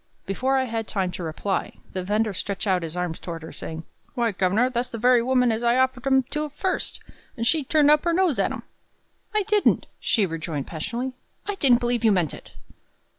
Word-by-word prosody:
Before 260 Hz, +8 st, 0 dB
I 260 Hz, -, +2 dB
had 225 Hz, -3 st, -3 dB
time 190 Hz, -3 st, -1 dB
to 180 Hz, -, -6 dB
reply, 165 Hz, +5 st, -2 dB, 0.2 s
the 185 Hz, -, -2 dB
vender 210 Hz, +2 st, 0 dB
stretched 195 Hz, +2 st, -3 dB
out 185 Hz, -3 st, +2 dB
his 165 Hz, +1 st, -5 dB
arm 180 Hz, -2 st, -1 dB
toward 165 Hz, -1 st, -7 dB
her, 160 Hz, -, -8 dB
saying, 160 Hz, 0 st, -6 dB, 0.3 s
"Why, 235 Hz, -2 st, +1 dB
governor, 195 Hz, +5 st, +2 dB
that's 250 Hz, 0 st, -2 dB
the 230 Hz, -, -5 dB
very 245 Hz, +1 st, +5 dB
woman 250 Hz, 0 st, +3 dB
as 220 Hz, +1 st, -1 dB
I 240 Hz, +1 st, +3 dB
offered 260 Hz, 0 st, +1 dB
'em 265 Hz, -1 st, +4 dB
to 300 Hz, 0 st, -2 dB
first, 370 Hz, +6 st, -2 dB, 0.4 s
and 230 Hz, -, -1 dB
she 305 Hz, +4 st, +2 dB
turned 295 Hz, +1 st, +4 dB
up 300 Hz, 0 st, +4 dB
her 340 Hz, -, +3 dB
nose 345 Hz, -5 st, +2 dB
at -, -, +2 dB
'em." -, -, -6 dB, 0.7 s
"I 425 Hz, -, +3 dB
didn't," 420 Hz, 0 st, +2 dB
she 215 Hz, -5 st, +2 dB
rejoined 160 Hz, -4 st, -4 dB
passionately; 235 Hz, +11 st, -4 dB, 0.3 s
"I 410 Hz, -, -2 dB
didn't 265 Hz, -10 st, +4 dB
believe 240 Hz, -1 st, 0 dB
you 220 Hz, -, +5 dB
meant 175 Hz, -7 st, +1 dB
it!" -, -, -12 dB
235 Hz, 210 wpm, -24 LUFS, 185-260 Hz, 0.7 s, very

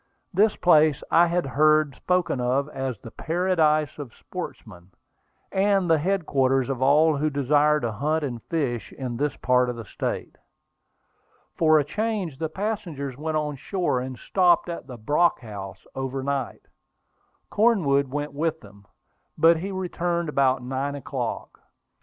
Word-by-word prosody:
This 205 Hz, +3 st, +3 dB
place 155 Hz, -4 st, +4 dB
I 170 Hz, +1 st, +6 dB
had 175 Hz, -1 st, 0 dB
heard 155 Hz, +2 st, +3 dB
spoken 180 Hz, -7 st, 0 dB
of 130 Hz, +3 st, +1 dB
as 135 Hz, -4 st, -4 dB
the 115 Hz, -, -11 dB
"paradise 160 Hz, -3 st, +1 dB
of 135 Hz, -6 st, -8 dB
sportsmen," 85 Hz, +1 st, -9 dB, 0.6 s
and 195 Hz, -1 st, +2 dB
the 160 Hz, -, +4 dB
headquarters 140 Hz, -7 st, +1 dB
of 130 Hz, -2 st, -3 dB
all 150 Hz, +3 st, +4 dB
who 155 Hz, +2 st, +1 dB
desire 145 Hz, +2 st, +2 dB
to 120 Hz, -, -1 dB
hunt 150 Hz, +8 st, -1 dB
and 120 Hz, -5 st, -4 dB
fish 135 Hz, -8 st, -2 dB
in 125 Hz, -3 st, -5 dB
this 145 Hz, +2 st, -1 dB
part 125 Hz, 0 st, +2 dB
of 125 Hz, -, -3 dB
the 115 Hz, -1 st, -8 dB
state. -, -, -5 dB, 1.2 s
For 155 Hz, -1 st, +4 dB
a 150 Hz, -, +3 dB
change, 200 Hz, -3 st, -3 dB
the 160 Hz, -1 st, -2 dB
passengers 175 Hz, -, -4 dB
went 155 Hz, +3 st, -2 dB
on 150 Hz, -2 st, -2 dB
shore 175 Hz, -3 st, -1 dB
and 130 Hz, 0 st, -6 dB
stopped 175 Hz, -, +2 dB
at 170 Hz, -5 st, -6 dB
the 125 Hz, -3 st, -8 dB
Brock 150 Hz, +10 st, +2 dB
House 100 Hz, -5 st, -9 dB
over 135 Hz, 0 st, -4 dB
night. 140 Hz, -2 st, -3 dB, 0.9 s
Cornwood 170 Hz, -12 st, +3 dB
went 145 Hz, +2 st, -4 dB
with 160 Hz, +2 st, -1 dB
them, 100 Hz, -1 st, -17 dB, 0.5 s
but 165 Hz, 0 st, +5 dB
he 185 Hz, +5 st, -4 dB
returned 175 Hz, -3 st, -2 dB
about 135 Hz, -3 st, +2 dB
nine 135 Hz, +3 st, -3 dB
o'clock. 140 Hz, -, -5 dB
150 Hz, 150 wpm, -25 LUFS, 130-170 Hz, 1.2 s, I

